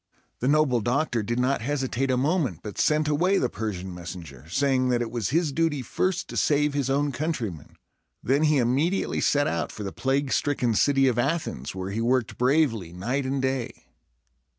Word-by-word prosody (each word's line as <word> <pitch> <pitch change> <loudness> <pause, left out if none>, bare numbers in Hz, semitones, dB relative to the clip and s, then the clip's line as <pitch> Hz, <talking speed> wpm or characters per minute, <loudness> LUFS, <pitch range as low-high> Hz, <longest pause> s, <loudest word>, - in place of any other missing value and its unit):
The 125 - -1
noble 140 -5 +3
doctor 120 +1 0
did 120 +3 -2
not 130 0 +1
hesitate 135 0 -1
a 130 - +2
moment, 135 - 0
but 105 - -7
sent 155 0 +2
away 175 +7 +2
the 125 - +1
Persian 95 -3 -4
messenger, 85 -5 -9
saying 130 +4 +1
that 120 -1 +2
it 115 - -6
was 115 -5 -2
his 160 +2 +1
duty 150 -2 0
first 185 +7 -1
to - - -5
save 150 -2 +2
his 140 -2 -1
own 145 +1 +1
countrymen. 125 - -4 0.5
Then 140 +5 +2
he 150 -1 +3
immediately 135 +10 +1
set 145 0 +2
out 85 - -2
for 105 - -7
the 95 - -5
plague 135 +1 0
stricken 130 -5 +1
city 135 +4 +3
of 120 -2 +1
Athens, 120 - -2
where 95 +1 -4
he 110 +3 -2
worked 125 0 0
bravely 125 - +2
night 125 +10 -2
and 135 0 -1
day. 130 -2 -3
130 Hz, 185 wpm, -26 LUFS, 115-145 Hz, 0.5 s, noble